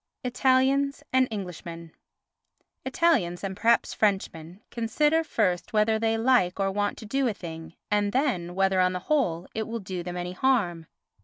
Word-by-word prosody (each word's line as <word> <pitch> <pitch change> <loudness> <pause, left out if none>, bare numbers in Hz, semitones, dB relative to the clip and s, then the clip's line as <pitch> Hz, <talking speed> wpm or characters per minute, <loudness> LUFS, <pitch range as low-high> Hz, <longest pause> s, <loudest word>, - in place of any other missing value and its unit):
Italians 265 +3 +2
and 260 0 +4
Englishmen 170 -5 -7 0.9
Italians, 245 - +1
and 190 -1 -3
perhaps 230 +4 +2
Frenchmen, 190 -4 -1
consider 295 +8 +1
first 195 - -1
whether 220 +1 +2
they 225 0 +1
like 225 -6 +2
or 195 0 +1
want 205 +1 -1
to 220 - -9
do 270 +4 0
a 220 - -1
thing 165 -2 -9 0.2
and 205 -1 +2
then 210 - -1
whether, 190 0 +2
on 185 0 +2
the - - -2
whole, 180 - +1
it 220 -1 -3
will 230 +1 -3
do 185 -3 -5
them 175 +1 -6
any 180 0 -4
harm. 185 - 0
205 Hz, 160 wpm, -26 LUFS, 180-250 Hz, 0.9 s, and